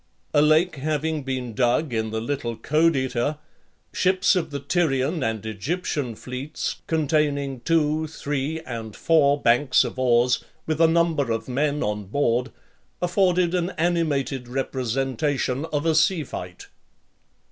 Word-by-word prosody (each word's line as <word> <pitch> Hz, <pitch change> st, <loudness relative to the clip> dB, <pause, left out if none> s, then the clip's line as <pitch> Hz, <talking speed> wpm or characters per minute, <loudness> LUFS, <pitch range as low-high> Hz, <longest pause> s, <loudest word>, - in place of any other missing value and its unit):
A 145 Hz, -, +5 dB
lake 155 Hz, +2 st, +3 dB
having 155 Hz, +2 st, -1 dB
been 130 Hz, -3 st, -4 dB
dug 125 Hz, +4 st, +1 dB
in 110 Hz, -1 st, -1 dB
the 110 Hz, +1 st, -2 dB
little 120 Hz, -1 st, -3 dB
Codeta, 145 Hz, -3 st, +1 dB, 0.6 s
ships 190 Hz, +2 st, +3 dB
of 170 Hz, -3 st, -1 dB
the 145 Hz, -1 st, -4 dB
Tyrian 140 Hz, 0 st, 0 dB
and 110 Hz, -3 st, -2 dB
Egyptian 125 Hz, -, -3 dB
fleets, 130 Hz, +6 st, -5 dB
containing 145 Hz, -4 st, 0 dB
two, 155 Hz, +2 st, +1 dB
three, 145 Hz, +1 st, -3 dB
and 115 Hz, -5 st, -7 dB
four 145 Hz, -3 st, +3 dB
banks 125 Hz, +2 st, +4 dB
of 125 Hz, +1 st, -5 dB
oars, 125 Hz, 0 st, +3 dB, 0.2 s
with 155 Hz, 0 st, -1 dB
a 165 Hz, -, +7 dB
number 165 Hz, -5 st, +2 dB
of 115 Hz, 0 st, -2 dB
men 145 Hz, +3 st, 0 dB
on 105 Hz, -1 st, -2 dB
board, 125 Hz, +3 st, 0 dB, 0.5 s
afforded 180 Hz, -1 st, +2 dB
an 180 Hz, -1 st, 0 dB
animated 145 Hz, -7 st, 0 dB
representation 135 Hz, +2 st, -1 dB
of 150 Hz, -2 st, -2 dB
a 165 Hz, -, +3 dB
sea 160 Hz, +1 st, +3 dB
fight. 90 Hz, -8 st, -8 dB
140 Hz, 135 wpm, -24 LUFS, 125-160 Hz, 0.6 s, a